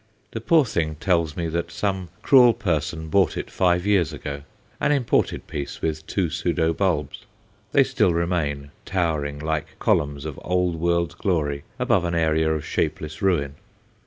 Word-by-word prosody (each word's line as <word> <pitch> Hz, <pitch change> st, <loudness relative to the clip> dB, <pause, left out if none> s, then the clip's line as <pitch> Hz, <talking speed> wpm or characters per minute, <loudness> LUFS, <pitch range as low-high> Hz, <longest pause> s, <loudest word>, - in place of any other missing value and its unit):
The 115 Hz, -, -5 dB
poor 155 Hz, +4 st, +4 dB
thing 80 Hz, -8 st, -1 dB
tells 85 Hz, -2 st, 0 dB
me 85 Hz, -1 st, -1 dB
that 85 Hz, +1 st, -2 dB
some 95 Hz, 0 st, -2 dB
cruel 125 Hz, -4 st, +6 dB
person 80 Hz, -3 st, -2 dB
bought 95 Hz, +1 st, +2 dB
it -, -, -5 dB
five 90 Hz, 0 st, +2 dB
years 100 Hz, -7 st, +2 dB
ago 70 Hz, 0 st, -6 dB, 0.4 s
an -, -, +2 dB
imported 135 Hz, -5 st, +1 dB
piece, 70 Hz, -2 st, -5 dB
with 80 Hz, -1 st, -3 dB
two 90 Hz, -5 st, -1 dB
pseudo 85 Hz, -2 st, 0 dB
bulbs. 80 Hz, -7 st, -1 dB, 0.5 s
They -, -, +5 dB
still -, -, +2 dB
remain, 80 Hz, -5 st, -1 dB
towering 80 Hz, -6 st, -1 dB
like 75 Hz, 0 st, -3 dB
columns 70 Hz, 0 st, 0 dB
of 75 Hz, -3 st, -6 dB
old 90 Hz, -1 st, 0 dB
world 85 Hz, 0 st, 0 dB
glory 75 Hz, -7 st, -1 dB
above 120 Hz, -7 st, +2 dB
an 85 Hz, -1 st, -1 dB
area 80 Hz, -1 st, +2 dB
of 80 Hz, -2 st, -2 dB
shapeless 75 Hz, +4 st, -2 dB
ruin. 85 Hz, -8 st, +1 dB
85 Hz, 160 wpm, -23 LUFS, 75-90 Hz, 0.5 s, cruel